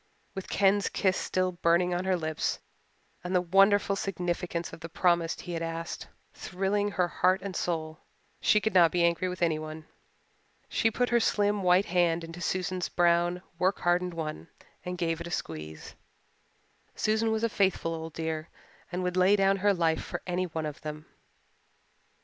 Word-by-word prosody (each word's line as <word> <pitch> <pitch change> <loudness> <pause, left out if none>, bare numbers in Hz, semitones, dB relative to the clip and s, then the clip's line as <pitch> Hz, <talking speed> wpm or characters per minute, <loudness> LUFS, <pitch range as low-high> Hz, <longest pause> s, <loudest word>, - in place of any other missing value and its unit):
With 190 - -7
Ken's 200 0 +3
kiss 190 -2 +1
still 185 -1 0
burning 175 +1 +2
on 180 +1 -2
her 190 -1 +2
lips, 155 -2 -2 0.7
and 180 +1 -2
the - - +5
wonderful 195 +3 +4
significance 175 -3 -3
of - - -9
the 165 +1 -8
promise 170 -1 +1
he 175 - -7
had 165 - -3
asked 165 +1 -5 0.3
thrilling 195 +2 -1
heart 185 0 +1
and 195 -2 -5
soul, 160 -2 -2 0.4
she 210 - +4
could 220 -1 -1
not 175 -3 +6
be 175 -1 +2
angry 170 +2 +2
with 180 -1 -3
anyone. 155 -1 -2 0.8
She 225 - +2
put 245 +2 0
her 240 0 +4
slim 205 -2 +1
white 180 +1 +4
hand 175 -3 +1
into 165 +1 -8
Susan's 185 +1 -2
brown, 175 +1 +2 0.2
work 185 +2 +1
hardened 175 0 +1
one 155 - -5 0.4
and 180 0 -4
gave 165 -1 -1
it 170 - -5
a - - -6
squeeze. 80 - -6 1.0
Susan 220 +1 +1
was 220 0 -1
a - - +4
faithful 190 -6 0
old 160 -1 -6
dear 160 0 -3 0.4
and 180 +1 -2
would 180 0 -1
lay 185 +2 +5
down 195 -1 +3
her 205 +2 +3
life 165 -4 +1
for 175 - -6
any 180 0 -1
one 160 -2 -4
of 150 0 -6
them. 155 0 -7
180 Hz, 170 wpm, -29 LUFS, 165-190 Hz, 1.0 s, not